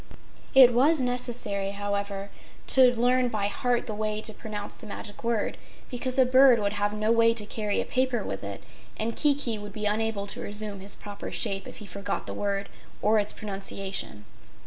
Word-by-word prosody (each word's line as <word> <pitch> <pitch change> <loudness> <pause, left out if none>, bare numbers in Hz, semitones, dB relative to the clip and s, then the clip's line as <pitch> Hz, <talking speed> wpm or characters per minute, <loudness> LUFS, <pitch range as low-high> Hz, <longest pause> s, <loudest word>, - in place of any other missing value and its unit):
It 255 -2 +9
was 285 +6 +4
necessary, 245 -6 -1
however, 200 -1 -3 0.4
to 250 -3 +6
learn 250 +1 +3
by 215 -4 -1
heart 245 +3 0
the 220 - -4
way 215 0 -2
to 220 - -2
pronounce 210 -1 -6
the 215 - -12
magic 205 0 -8
word, 230 -2 -1 0.3
because 255 +1 -1
a 260 - +6
bird 255 0 +6
would 205 -2 -1
have 205 0 0
no 215 +1 0
way 230 0 +4
to 215 -3 +2
carry 210 -1 -2
a - - -1
paper 255 -1 0
with - - -5
it, - - -6 0.3
and 225 +1 -2
Kiki 280 -7 +1
would 205 -1 -8
be 210 0 -4
unable 210 -1 0
to 200 - -4
resume 205 -1 -2
his 195 +1 +1
proper 205 -1 -8
shape 195 0 -2
if - - -10
he 210 - -10
forgot 200 0 -4
the - - -5
word 200 -1 -2 0.3
or 215 +1 +3
its 205 0 -1
pronunciation. 195 - -5
215 Hz, 190 wpm, -27 LUFS, 205-245 Hz, 0.4 s, It